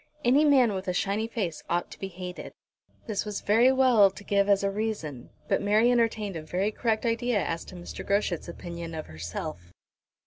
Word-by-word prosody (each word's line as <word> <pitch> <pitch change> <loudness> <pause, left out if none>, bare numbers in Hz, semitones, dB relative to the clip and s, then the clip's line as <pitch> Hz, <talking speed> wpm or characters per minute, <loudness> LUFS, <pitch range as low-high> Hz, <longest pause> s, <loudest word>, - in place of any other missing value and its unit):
Any 275 +5 +5
man 260 -7 +5
with 190 0 -5
a 180 - 0
shiny 205 +4 0
face 200 -8 -3
ought 175 +1 -1
to - - -11
be 195 - -4
hated." 180 -1 -8 0.5
This 215 -3 -2
was 210 -1 -4
very 230 +5 +5
well 255 -6 +5
to 195 +2 -12
give 200 0 +1
as 200 0 +4
a 200 - +1
reason, 195 - -4 0.2
but - - +1
Mary 215 +4 +4
entertained 220 -5 +1
a 160 - -4
very 185 +7 -1
correct 220 +1 -1
idea 230 -2 +1
as 165 0 -3
to - - -11
Mr. 175 -1 -7
Groschut's 200 -4 0
opinion 170 -1 -7
of 155 - -5
herself. 85 +1 -7
200 Hz, 195 wpm, -27 LUFS, 175-225 Hz, 0.5 s, Any